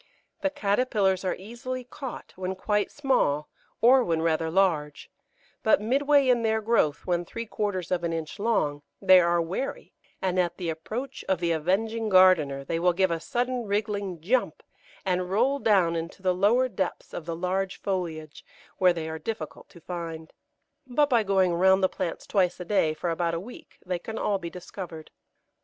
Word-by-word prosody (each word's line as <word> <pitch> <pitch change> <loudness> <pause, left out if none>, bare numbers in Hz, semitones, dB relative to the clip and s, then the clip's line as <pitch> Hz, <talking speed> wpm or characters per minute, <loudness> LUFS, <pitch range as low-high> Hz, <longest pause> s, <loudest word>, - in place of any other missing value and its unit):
The 290 - +1
caterpillars 205 -6 +1
are 185 - 0
easily 240 +6 -6
caught 250 +1 -8
when 185 0 -3
quite 210 +2 0
small 250 - 0 0.3
or 250 +3 +6
when 165 -4 0
rather 160 0 +1
large; 160 -5 0 0.5
but 220 - +4
midway 275 +5 +3
in 245 -2 +4
their 220 -1 +1
growth, 215 -10 +1
when 175 -1 0
three 230 +6 -6
quarters 200 -5 -3
of 175 -1 0
an 170 - -1
inch 165 +3 -5
long, 150 -10 0 0.2
they 185 -1 +7
are 170 0 +3
wary, 195 - -4 0.3
and 185 -1 0
at 175 -1 0
the 175 -3 -2
approach 220 +12 -6
of 190 -3 +2
the 170 -1 0
avenging 215 +8 0
gardener 180 -8 +5
they 165 +4 -1
will 180 +1 +3
give 190 0 +2
a 165 - -1
sudden 245 +2 -2
wriggling 200 -3 -2
jump, 240 +9 0 0.4
and 180 -1 0
roll 250 +8 +2
down 195 -7 +3
into 165 +3 -5
the 185 -1 +3
lower 220 +8 +3
depths 190 -7 -4
of 165 - -6
the 165 - -2
large 185 +2 -2
foliage, 165 -6 -4 0.4
where 180 -1 +5
they 165 -2 -4
are 160 0 -5
difficult 160 -3 -6
to 170 - -15
find. 165 -2 -6 0.5
But 290 +3 +2
by 235 -2 +5
going 190 -3 +2
round 190 +2 +4
the - - +6
plants 180 -4 -4
twice 185 -3 +1
a 180 - -6
day 165 -5 +2
for 170 +2 -2
about 170 0 -1
a - - -2
week 230 +8 -12
they 180 -1 -2
can 220 +5 -7
all 200 -3 0
be 170 -2 -5
discovered. 175 -2 -9
185 Hz, 180 wpm, -27 LUFS, 170-220 Hz, 0.5 s, they